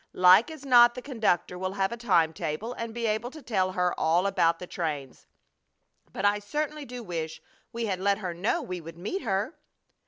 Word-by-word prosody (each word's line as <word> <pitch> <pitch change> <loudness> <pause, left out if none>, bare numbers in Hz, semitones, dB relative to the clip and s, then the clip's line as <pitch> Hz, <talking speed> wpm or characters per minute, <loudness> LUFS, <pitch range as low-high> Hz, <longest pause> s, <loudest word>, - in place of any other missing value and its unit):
Like 185 - +6
as 310 -3 -10
not 240 -2 +7
the 250 - -6
conductor 215 -9 0
will 185 0 -2
have 195 0 0
a - - -3
time 170 -9 +2
table 165 +9 -4
and 230 -2 -5
be 235 +1 -3
able 220 +2 -1
to 310 +3 -11
tell 190 -6 0
her 180 -1 +1
all 170 +4 +2
about 170 -4 +2
the 180 - -8
trains. 150 -7 -5 0.8
But 190 - -3
I 205 0 +3
certainly 295 +7 -3
do 245 -1 -8
wish 165 -5 -4 0.3
we 235 -1 -3
had 190 -4 -2
let 200 +1 +2
her 185 -5 -4
know 180 +6 -1
we 180 -1 -5
would 165 +1 -10
meet 210 - -4
her." 220 - -2
200 Hz, 205 wpm, -27 LUFS, 180-235 Hz, 0.8 s, not